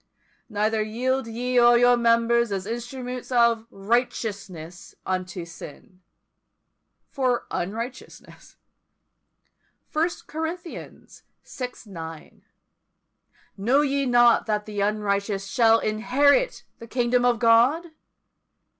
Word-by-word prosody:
Neither 215 +1 0
yield 250 +4 -1
ye 245 +3 -4
your 245 0 +6
members 235 -1 +2
as 190 -1 -3
instruments 245 +3 -6
of 235 -2 +3
righteousness 195 -5 -3
unto 185 -1 -3
sin 170 +2 -12 1.1
for 255 -3 0
unrighteousness. 230 +8 -7 1.3
First 330 +3 -2
Corinthians 325 +2 -7 0.2
vi. 250 -2 -5 0.2
9. 165 -5 -10 1.1
Know 240 +8 +2
ye 280 -1 0
not 240 -1 +4
that 210 -1 -1
the 210 -1 -4
unrighteous 200 -1 -1
shall 225 +3 +4
inherit 255 - +2 0.2
the 230 - -10
kingdom 245 0 +1
of 245 -1 +3
God? 245 +9 +3
235 Hz, 95 wpm, -24 LUFS, 210-250 Hz, 1.3 s, your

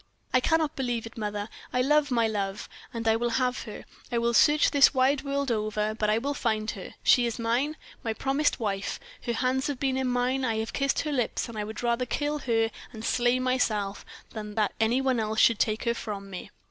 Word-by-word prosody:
I 255 - +6
cannot 315 +3 +1
believe 245 -4 -2
it, 225 - -10
mother, 210 -2 -3 0.2
I 250 0 +1
love 295 +2 +3
my 230 -3 +2
love, 200 -2 -3 0.2
and 230 -1 -4
I 220 - +5
will 240 +1 0
have 250 -1 0
her - - -8 0.3
I 240 - 0
will 235 0 +1
search 295 +5 +5
this 285 -1 +6
wide 265 +2 +3
world 280 -1 -1
over, 215 -1 -1
but 215 -1 -1
I 215 - +3
will 280 +5 -1
find 220 -5 -1
her. 195 - -9
She 245 -1 +5
is 230 - -3
mine 245 +7 0 0.3
my 225 - -1
promised 275 +6 0
wife; 200 -3 -2 0.3
her 235 - 0
hands 260 +2 0
have 285 -3 -3
been 265 -1 0
in 265 -1 0
mine, 250 +2 0
I 225 -3 0
have 220 +1 -3
kissed 275 0 +1
her 305 - -3
lips, 255 -3 -1
and 235 - -9
I 210 - -2
would 220 +3 -6
rather 240 +1 +1
kill 295 +3 -1
her 225 -4 +1 0.2
and 225 -2 -8
slay 245 0 +2
myself 225 -6 0 0.3
than 210 -1 -7
that 215 -3 +1
any 230 +4 +2
one 260 -3 +1
else 220 0 -1
should 230 -3 +5
take 215 0 +1
her 235 - +1
from 200 -4 -6
me." 185 +2 -7
235 Hz, 225 wpm, -27 LUFS, 220-265 Hz, 0.3 s, I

